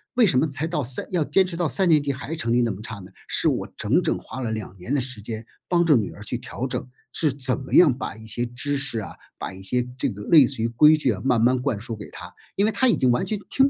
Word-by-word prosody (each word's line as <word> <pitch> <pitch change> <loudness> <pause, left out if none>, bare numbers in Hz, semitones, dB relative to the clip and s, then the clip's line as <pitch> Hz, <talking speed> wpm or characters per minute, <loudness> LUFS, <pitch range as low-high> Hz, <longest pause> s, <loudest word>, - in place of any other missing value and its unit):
为 250 -2 +5
什 150 -10 +2
么 140 - +3
才 145 +3 -2
到 160 -3 -2
三 125 +1 0
要 175 -3 +2
坚 170 +6 +3
持 180 -2 -5
到 170 -2 -1
三 190 -2 +3
年 155 -3 +4
级 140 - -1
还 135 0 -7
是 160 - -3
成 115 -7 -2
绩 120 +1 +3
那 120 -2 +1
么 100 +1 -8
差 110 0 -7
呢？ 95 -2 -11 0.2
是 - - +3
我 - - -1
整 - - +2
整 - - -1
花 130 - -8
了 115 -3 -2
2 110 -3 -6
年 95 +10 -5
的 145 - +2
时 125 -4 -2
间 110 +1 -6 0.2
帮 175 -1 +3
着 155 -3 +5
女 110 -5 0
儿 - - -13
去 115 +3 -3
调 125 +1 -5
整， - - -3 0.3
是 155 -4 +1
怎 130 -2 +1
么 130 - -9
样 145 -9 +6
把 120 - -6
一 110 - -12
些 120 +3 -2
知 125 +4 -2
识 135 -5 +1
啊， 95 - -7 0.3
把 - - -5
一 95 - -11
些 125 +5 +2
这 - - 0
个 105 -3 -8
类 155 0 +6
似 130 -2 -2
于 115 - +1
规 150 +7 +5
矩 135 -6 +1
啊， 95 - -7
慢 125 -4 +2
慢 125 +2 +3
灌 130 -6 -1
输 115 +1 -4
给 105 -1 -10
她， - - -10 0.2
因 200 - +3
为 220 - +2
她 260 +5 +3
已 - - +3
经 130 - +2
完 120 0 +1
全 215 -2 -3
听 270 +1 +3
130 Hz, 320 characters per minute, -23 LUFS, 115-155 Hz, 0.3 s, 样